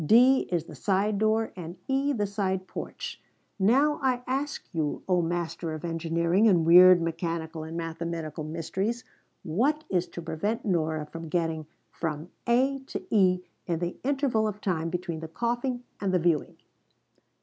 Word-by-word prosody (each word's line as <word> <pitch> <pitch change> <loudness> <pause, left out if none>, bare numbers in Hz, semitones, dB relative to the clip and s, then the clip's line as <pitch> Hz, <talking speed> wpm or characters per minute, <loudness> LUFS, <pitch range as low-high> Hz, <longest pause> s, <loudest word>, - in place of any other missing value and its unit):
D 250 - +5
is 170 -3 +1
the 165 - -12
side 200 +6 +1
door 220 +1 +1
and 175 0 -7
E 275 +2 +1
the 215 -7 0
side 190 -2 -2
porch. 480 -1 -6 0.4
Now 275 +10 +4
I 255 -2 +1
ask 275 +3 -2
you, 155 -3 -1
oh 180 -2 +3
master 170 -1 -2
of 155 - -6
engineering 170 +4 +2
and 175 -6 +4
weird 180 +2 +9
mechanical 165 -1 -3
and 160 +1 -6
mathematical 165 -1 -4
mysteries, 175 +10 -2 0.4
what 255 - +1
is 180 -1 +1
to 170 - -8
prevent 205 +8 -2
Nora 160 -5 0
from 165 +1 -8
getting 160 -2 -1 0.2
from 160 +1 -4 0.2
A 265 +3 +3
to - - -5
E 185 -3 +4 0.3
in 170 -2 0
the 175 +1 -3
interval 265 -5 +1
of 210 -1 -4
time 165 -5 -1
between 170 -1 -3
the 160 - -6
coughing 240 +7 -2 0.2
and 195 -2 0
the 185 - +3
viewing?" 165 -3 +1
180 Hz, 160 wpm, -28 LUFS, 165-225 Hz, 0.4 s, weird